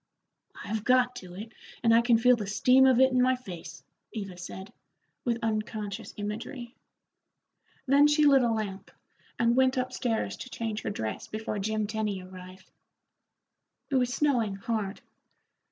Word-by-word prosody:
"I've 215 0 -3
got 250 0 +3
to 180 -1 -10
it, 215 +4 -8 0.3
and 230 -1 +5
I 230 - +6
can 235 -1 +4
feel 250 +2 +5
the 210 -4 -5
steam 255 +6 +5
of 255 -2 +4
it 265 0 +5
in 255 0 +3
my 255 +1 +3
face," 165 - -10 0.3
Eva 195 -5 -6
said, 190 +2 -9 0.5
with 235 -2 0
unconscious 215 -2 -3
imagery. 230 +4 -6 1.1
Then 280 +2 +5
she 295 0 +3
lit 275 -2 +6
a 240 - +2
lamp, 210 -3 -4 0.5
and 235 0 +2
went 260 0 +3
up 255 0 -1
stairs 235 -4 -2
to 255 - -8
change 220 -3 -4
her - - -3
dress 110 - -4
before 215 -1 -4
Jim 215 +1 -1
Tenny 210 -2 -2
arrived. 185 0 -12 1.2
It 270 - +3
was 250 -1 +1
snowing 250 -8 +1
hard. 205 0 -3
225 Hz, 155 wpm, -28 LUFS, 200-250 Hz, 1.2 s, I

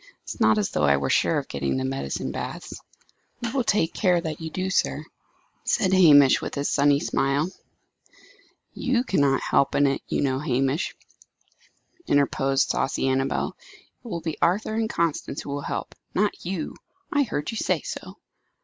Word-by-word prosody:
It - - -11
is - - -17
not 110 0 +5
as 105 - 0
though 75 - +1
I 70 0 +4
were 70 -1 -1
sure - - +2
of - - -3
getting 70 -1 -2
to 65 - -1
the - - -1
medicinal 70 +1 -3
baths." - - -6 0.6
"We 235 -1 -3
will 260 -1 0
take 200 -7 +1
care 180 -4 +2
that 160 -2 -5
you 160 - -4
do 185 +4 -4
that, 190 - -2
sir," - - 0 0.6
said 190 -1 +1
Hamish, 145 -7 +7
with - - -5
his 140 0 -1
sunny 145 0 +3
smile. 145 +5 0 1.2
"You 255 -2 0
cannot 140 - +2
help 140 - +2
in 145 - +4
it, 140 -1 0
you - - -1
know, 130 -2 0
Hamish," 135 +3 0 1.1
interposed 135 -1 +2
saucy 135 - 0
Annabel. 135 +1 0 0.5
"It - - -11
will 170 -6 -4
be 160 -2 -5
Arthur 200 +5 +1
and 220 0 0
Constance 165 -4 -1
who - - -8
will 145 0 -3
help - - -4 0.2
not 205 +2 +2
you. 180 -4 -3 0.4
I 290 - +3
heard 210 - -2
you 225 - -5
say - - 0
so!" - - -7
145 Hz, 180 wpm, -25 LUFS, 135-185 Hz, 1.2 s, Hamish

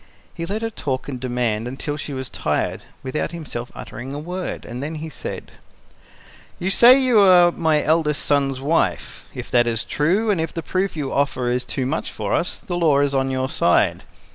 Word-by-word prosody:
He 170 0 -5
let 210 +4 -3
her 225 - -2
talk 135 -10 -3
and 135 -3 -5
demand 120 -3 -1
until 135 +3 -4
she 150 0 -6
was 130 -1 -4
tired, - - -2 0.2
without 135 +5 -3
himself 135 -7 -6
uttering 135 +3 -7
a - - -4
word, 180 +4 -5
and 120 +1 -6
then 155 +3 -4
he 160 +1 -6
said: - - -7 1.1
"You 190 +2 -1
say 250 +6 +8
you 255 -4 +4
are 180 -3 +7
my 160 -3 +1
eldest 155 -1 +1
son's 140 -2 +1
wife. 135 - -1
If - - -7
that 120 -1 +4
is 115 -2 0
true, 195 +9 +1
and 180 -5 +1
if 160 - -4
the 165 - -3
proof 185 0 -1
you 140 -3 -3
offer 135 -3 0
is 125 +1 0
too 130 - -2
much 145 +5 -2
for - - -3
us, 175 - 0
the 175 - -5
law 160 -5 +3
is 140 -1 +2
on 135 0 +1
your 130 0 -1
side. - - +2
150 Hz, 200 wpm, -22 LUFS, 130-175 Hz, 1.1 s, say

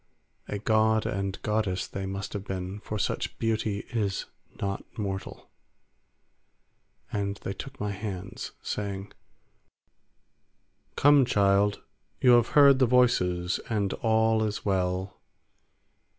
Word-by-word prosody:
A 105 - -3
god 110 +1 +2
and 95 0 -2
goddess 105 -4 0
they 95 0 -5
must 95 +1 -5
have 100 -2 -4
been, 95 0 -5
for 105 0 -5
such 100 - -2
beauty 110 -2 -1
is 100 -5 -1 0.3
not 100 0 -2
mortal; 95 -3 -5 1.6
and 100 -1 -2
they 95 - -3
took 130 +6 -9
my 105 0 -2
hands, 95 -2 -6
saying, 100 -1 -4 1.8
"Come, 145 -1 +6
child, 100 -2 +2 0.4
you 125 - +5
have 120 -1 +6
heard 140 -2 +8
the 130 - +4
voices, 90 -8 +2
and 105 -4 0
all 110 0 +2
is 105 -1 -3
well. 95 -1 -1
100 Hz, 115 wpm, -28 LUFS, 95-110 Hz, 1.8 s, heard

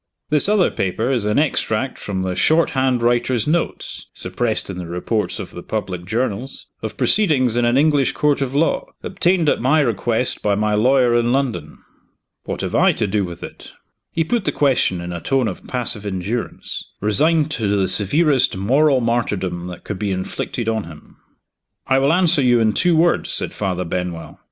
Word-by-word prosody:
"This 150 +5 +4
other 210 -4 +3
paper 110 +7 -1
is 120 -6 0
an 105 0 +1
extract 130 -4 0
from 95 -2 -3
the 95 -1 -2
short 160 - +2
hand 130 -3 +1
writer's 120 -1 +1
notes 165 +2 -2
(suppressed 110 +5 -2
in 95 -2 -6
the 90 - -6
reports 90 +3 -2
of - - -7
the 90 - -8
public 90 -4 -4
journals) 115 +4 -3 0.2
of - - -6
proceedings 140 - +2
in 120 0 +2
an 120 +2 +2
English 145 -2 +3
court 145 -1 +1
of 135 0 -2
law, 160 +3 +1 0.2
obtained 180 -3 +1
at - - +2
my 135 +6 +3
request 120 -1 0
by 105 -1 +1
my 105 +1 0
lawyer 125 +2 +3
in 120 0 +2
London." 120 - -2 0.7
"What - - -4
have - - -3
I - - +4
to - - -1
do 100 0 0
with 85 -2 -7
it?" - - -10 0.4
He 165 - 0
put 220 +4 -1
the - - +1
question 130 -10 +1
in 85 0 -5
a 85 - -5
tone 135 +2 +1
of 95 - -7
passive 120 -4 -3
endurance 100 +4 -4 0.2
resigned 150 +9 +2
to 110 -7 -1
the 100 -1 +1
severest 130 - +2
moral 135 +7 +3
martyrdom 95 -7 -1
that 90 -1 -9
could 100 -3 -5
be 105 - -1
inflicted 95 +4 -4
on 110 -3 -1
him. 80 -2 -14 0.7
"I 130 0 +3
will 135 +2 +3
answer 175 -3 +3
you 120 -2 +4
in 110 -2 +2
two 175 - +2
words," 170 +2 +2
said - - -3
Father 90 -3 -2
Benwell. 90 -1 -5
120 Hz, 185 wpm, -20 LUFS, 100-140 Hz, 0.7 s, This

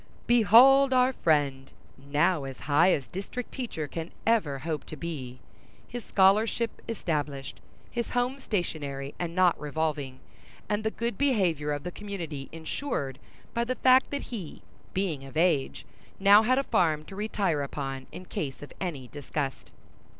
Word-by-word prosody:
Behold 245 +5 +7
our 255 +1 +4
friend 145 - +1 0.2
now 145 +4 +1
as 135 -1 -8
high 155 +6 +4
as 140 - 0
district 200 +6 -6
teacher 225 - -4
can 165 +3 -6
ever 200 -12 +2
hope 155 +2 -3
to - - -8
be—his 155 - -9
scholarship 215 +4 +2
established, 150 - -3 0.3
his 235 -1 -2
home 250 +2 0
stationary 145 - -3
and 170 -1 -3
not 185 -2 +4
revolving, 150 -3 -2 0.5
and 210 +1 -1
the 220 - +1
good 235 +2 -3
behavior 185 - +2
of 145 -1 -3
the 180 - -4
community 170 -9 -6
insured 160 - -4 0.3
by 235 - +1
the 255 +2 -2
fact 255 +1 +5
that 285 - -3
he, 190 -9 -7 0.3
being 175 -8 -2
of 135 +3 -8
age, 165 -5 +1 0.3
had - - -29
now 200 +2 +8 0.2
a - - 0
farm 155 - +1
to 195 - -10
retire 195 -7 0
upon 135 -1 -4
in 185 - -9
case 140 -5 -5
of 145 - -10
any 150 -9 -4
disgust. 145 0 -4
170 Hz, 150 wpm, -28 LUFS, 145-220 Hz, 0.5 s, now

